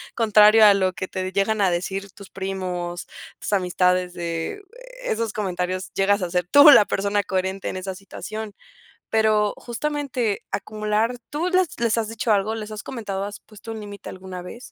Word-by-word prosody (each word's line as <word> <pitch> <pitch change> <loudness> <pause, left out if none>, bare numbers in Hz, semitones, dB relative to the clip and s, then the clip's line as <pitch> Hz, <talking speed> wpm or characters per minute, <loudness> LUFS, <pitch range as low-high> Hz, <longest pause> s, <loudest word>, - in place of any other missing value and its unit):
contrario 215 -1 +6
a 205 - +8
lo 185 -1 +1
que 185 - -5
te 185 0 -4
llegan 200 +2 +1
a 190 - +3
decir 190 +2 -3
tus 200 -1 -13
primos, 185 -2 -4 0.3
tus - - -4
amistades 180 -1 +1
de 170 - -4 0.4
esos 225 - -1
comentarios, 185 -2 -3
llegas 200 +1 +2
a 170 - -3
ser 180 -1 0
tú 285 +1 +9
la 215 - +8
persona 200 +1 0
coherente 190 0 -2
en - - -5
esa 185 0 -5
situación. 215 +2 -7 0.6
Pero 215 -2 +2
justamente, 250 -3 -2
acumular, 215 +3 -1
¿tú 320 +4 -1
les 370 -1 +3
les 230 -1 +2
has 225 -2 0
dicho 225 0 -1
algo, 210 +2 +1
les 215 -1 -6
has 215 -1 -6
comentado, 200 -6 -4
has 205 0 -8
puesto 215 +1 -11
un 220 - -7
límite 205 0 -9
alguna 185 -1 -8
vez? 235 +8 -10
205 Hz, 175 wpm, -23 LUFS, 185-220 Hz, 0.6 s, tú